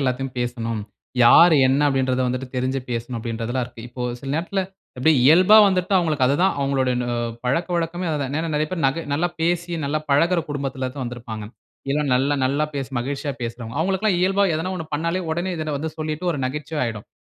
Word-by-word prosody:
எல்லாத்தையும் 130 -1 -2
பேசணும். 115 -2 -2 0.4
யார், 170 +7 +8
என்ன, 135 +2 +2
அப்படின்றத 130 -2 +1
வந்துட்டு 130 +1 -3
தெரிஞ்சு 130 +1 -1
பேசணும் 120 +1 -3
அப்படின்றதுல்லாம் 115 +2 -3
இருக்கு. 120 -1 -12
இப்போ 125 +1 -7 0.2
சில 135 - -8
நேரத்தில 175 +4 -1 0.4
எப்படி 160 +5 +4
இயல்பா 180 +8 +7
வந்துட்டு 185 +1 0
அவங்களுக்கு 155 -6 +1
அது 140 - +2
தான் 190 - +3
அவங்களோட 135 -2 +1
நு 125 - -2 0.4
பழக்கவழக்கமே 170 +5 -1
அது 150 - -1
தான். 135 0 -3
ஏன்னா 165 +1 -2
நிறைய 155 +1 +1
பேர் 180 -3 -3
நக 160 +5 -1
நல்லா 165 +5 +1
பேசி, 175 +1 0
நல்லா 150 +2 0
பழகுற 170 +5 +3
குடும்பத்தில 135 -2 -3
தான் 135 - -5
வந்திருப்பாங்க. 115 -3 -6 0.5
எல் 150 - +1
அ - - -2
நல்ல 140 +3 +2
நல்லா 140 +3 +1
பேசு 135 -1 -4
மகிழ்ச்ச்சியா 140 +3 -3
பேசுறவங்க. 115 0 -5
அவங்களுக்கு 190 +3 0
எல்லாம் 190 -5 +3
இயல்பா 195 +2 +3
ஏதனா 175 +4 -2
1 160 -2 -6
பண்னாலே 170 +4 -1
உடனே 175 +3 -1
இத 155 -1 -4
வந்து 160 +1 -3
சொல்லிட்டு, 155 +2 -3
ஒரு 145 - -4
நகைச்சுவை 150 +3 -3
ஆயிடும். 110 -3 -5
140 Hz, 190 wpm, -22 LUFS, 125-165 Hz, 0.5 s, யார்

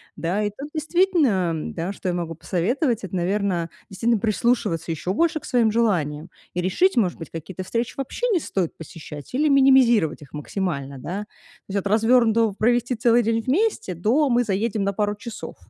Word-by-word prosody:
Да, 185 +6 -1
и 205 - 0
тут 285 +2 -7
действительно, 310 - +2
да, 170 +4 -4
что 190 - -7
я 175 - -1
могу 165 -2 -3
посоветовать, 220 - -1
это, 190 0 -5
наверно, 180 -1 0 0.2
действительно 225 +3 0
прислушиваться 215 -6 0
еще 165 +4 -2
больше 325 +3 +1
к - - -13
своим 230 -3 +2
желаниям 170 -9 0 0.3
и 180 - 0
решить, 250 - +2
может 190 -7 +1
быть, 165 - -8
какие-то 170 +3 -7
встречи 230 +5 -2
вообще 275 - -3
не 355 - +3
стоит 185 - -2
посещать 155 - -9
или 300 +3 +2
минимизировать 255 - +4
их 140 - -17
максимально, 150 -4 -3
да. 175 +9 -5
То - - -44 0.5
есть 200 - +2
от 195 - -8
развернутого 225 0 +3
"провести 240 +4 +1
целый 235 +1 +3
день 225 0 0
вместе" 300 - 0
до 245 - +2
"мы 245 +1 +3
заедем 210 +1 -1
на 200 0 0
пару 205 0 0
часов". 225 +2 -8
210 Hz, 180 wpm, -23 LUFS, 175-245 Hz, 0.5 s, минимизировать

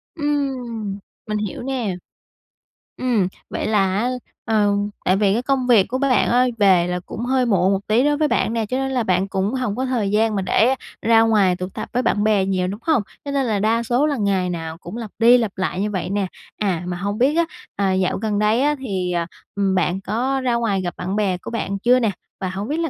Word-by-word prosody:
Ừm, 255 -9 -2 0.3
mình 210 0 -1
hiểu 210 +2 -4
nè. 245 -8 -2 1.0
Ừm, 230 -8 +1 0.2
vậy - - -3
là 195 -3 +2
á, 240 +4 +1 0.4
ờ, 210 -2 +2 0.3
tại 185 - +4
vì 200 -1 +3
cái 235 - +1
công 260 -1 0
việc 220 -6 +5
của 255 - -2
bạn 265 -1 +2
á, 250 +1 +4
về 185 -4 +4
là 180 0 -2
cũng 235 - -5
hơi 260 0 +2
muộn 190 -4 +3
một 195 +1 -3
tí 225 +5 +3
đối 295 0 +2
với 305 0 +2
bạn 225 - 0
nè, 225 -2 0
cho 255 +5 -2
nên 270 0 -1
là 250 -3 0
bạn 185 0 +1
cũng 195 +4 -1
hổng 250 -6 -1
có 260 - -1
thời 235 -6 -1
gian 215 +1 +2
mà 195 - 0
để 230 +7 +3 0.3
ra 225 0 +5
ngoài 210 -5 +3
tụ 185 +1 -5
tập - - -7
với 250 - +1
bạn 205 - +1
bè 210 -3 +3
nhiều, 185 -2 0
đúng 200 +3 -5
hông? 310 -9 +3 0.2
Cho 280 - -3
nên 275 -2 +1
là 210 -3 0
đa 225 +3 +1
số 245 +5 +2
là 290 - -1
ngày 195 -4 +1
nào 165 -1 -5
cũng 210 - -8
lặp 225 -4 -6
đi 240 +2 +7
lặp 225 -5 -1
lại 185 0 -1
như 210 - -1
vậy 185 -2 -3
nè. 200 -1 0 0.3
À, 185 -5 -1
mà 175 - -3
hông 200 +3 -3
biết 270 +6 +3
á, 340 - +4 0.3
à, 195 -1 +1
dạo 185 -1 +1
gần 210 0 -1
đây 215 +3 +2
á 295 +1 +2
thì, 190 -8 -2
ờ, 170 -1 0 0.3
ừm, 195 -1 +1
bạn 185 +1 0
có 255 +7 -1
ra 250 -2 +1
ngoài 220 -5 0
gặp 175 -1 -4
bạn 185 +3 -3
bè 195 -4 +1
của - - -9
bạn 200 -4 -2
chưa 245 +4 +4
nè? 225 -4 +1 0.3
Và 185 - -2
hông 195 +3 -4
biết 305 +4 -2
là 330 -2 0
215 Hz, 245 wpm, -21 LUFS, 190-250 Hz, 1.0 s, đi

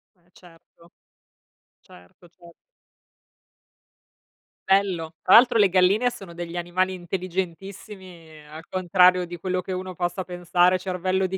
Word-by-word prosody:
Eh, 175 0 -34
certo. 170 -1 -21 0.9
Certo, 90 - -19
cer 170 0 -18 2.2
Bello. 185 -5 +1
Tra 185 - +5
l'altro 245 0 +6
le 200 -2 +5
galline 195 +7 +3
sono 195 -7 -11
degli 175 0 -7
animali 185 +2 -1
intelligentissimi 180 -2 -7
al 155 +2 -12
contrario 180 0 +3
di 175 0 -9
quello 185 +1 -3
che 190 - -8
uno 185 0 -5
possa 175 +1 -3
pensare, 180 +1 +1
cervello 185 +1 -2
di 190 +1 -3
180 Hz, 120 wpm, -23 LUFS, 170-190 Hz, 2.2 s, l'altro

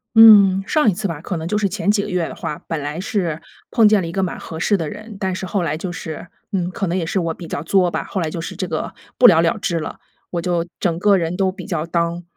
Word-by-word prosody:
嗯， 205 -4 +8
上 300 -9 +3
一 - - -3
次 200 +2 -2
吧， 160 -3 -5
可 180 -1 -4
能 160 - -4
就 210 +4 0
是 200 -2 +1
前 205 +1 -2
几 205 -1 +3
个 - - -5
月 180 -3 0
的 - - -8
话， 150 - -5
本 160 -3 -3
来 150 +4 -4
是 180 -7 -2 0.3
碰 225 -3 +5
见 210 -2 +4
了 170 - -4
一 165 - -5
个 190 - -1
蛮 180 - -3
合 160 - -8
适 205 - +2
的 160 -6 -2
人， 215 0 -9
但 190 -2 -2
是 185 - -4
后 190 0 -1
来 155 -2 -1
就 180 +2 -4
是， 160 0 -7 0.2
嗯， 180 -3 -1
可 195 - -2
能 175 - -1
也 170 - -1
是 190 - -2
我 165 -2 -1
比 170 - -10
较 145 - -4
作 180 +1 +3
吧， - - -3
后 195 - -4
来 165 -3 -1
就 165 +1 -5
是 - - -7
这 185 - -2
个 160 -2 -3 0.2
不 245 - +8
了 165 -5 +6
了 165 +3 +1
之 175 -5 -1
了。 155 - -6 0.3
我 175 - -2
就 170 -1 0 0.2
整 170 -2 0
个 205 +1 +4
人 170 +1 -2
都 190 -1 +2
比 185 -1 -7
较 170 -6 -2
down， 170 +1 -1
180 Hz, 325 characters per minute, -20 LUFS, 165-200 Hz, 0.3 s, 嗯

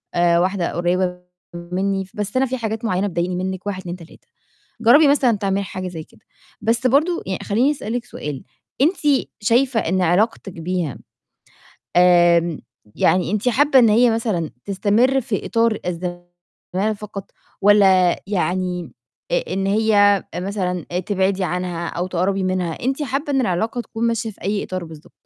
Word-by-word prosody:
آآ، 170 0 +3
واحدة 185 -1 0
قُريبة 180 +1 0 0.4
مني، 190 +3 -2
بس 210 +3 -3
أنا 265 - +3
في 260 0 -3
حاجات 225 0 -4
معينة 200 -1 0
بتضايقيني 180 +1 -2
منِك، 190 +1 -4
1 190 -2 -3
2 175 -1 -6
3. 165 -2 -16 0.5
جربي 280 +7 +6
مثلًا 255 -6 +3
تعملي 195 0 -1
حاجة 185 -1 -6
زي 160 -3 -7
كده. - - -23 0.4
بس 235 +3 +1
برضو 315 +7 +2
يعني 190 -1 -3
خليني 240 +8 +2
أسألِك 245 -4 -4
سؤال 145 - -6 0.4
أنتِ 335 +7 +4 0.5
شايفة 235 +3 +2
إن 185 +1 0
علاقتِك 195 +3 +1
بيها، 170 -3 -3 1.0
آمم، 175 -2 +4 0.4
يعني 180 -1 +2
أنتِ 215 +4 0
حابة 275 +3 +4
إن 235 -3 +6
هي 235 +3 +5
مثلًا 215 -8 -1
تستمر 220 +7 +2
في 220 -4 -3
إطار 230 -2 +1
الزمَالة 175 +3 -5
فقط، 200 -1 -8 0.3
والّا 190 -3 +5
يعني، 180 - -2 0.4
أ - - +3
أ - - -4
إن 195 0 -1
هي 205 -1 +3
مثلًا 180 -2 -2
أ 180 - 0
تبعدي 190 0 0
عنها 180 -1 -3
أو 175 +2 -3
تقربي 185 +2 0
منها؟ 185 -2 -1
أنتِ 270 +3 -1
حابة 285 +1 -2
إن 270 - +2
العلاقة 220 +3 -1
تكون 235 -1 -3
ماشية 230 -1 -2
في 200 - -17
أي 200 +3 -1
إطار 185 -2 -5
بالضبط؟ 160 -1 -13
195 Hz, 155 wpm, -20 LUFS, 180-225 Hz, 1.0 s, جربي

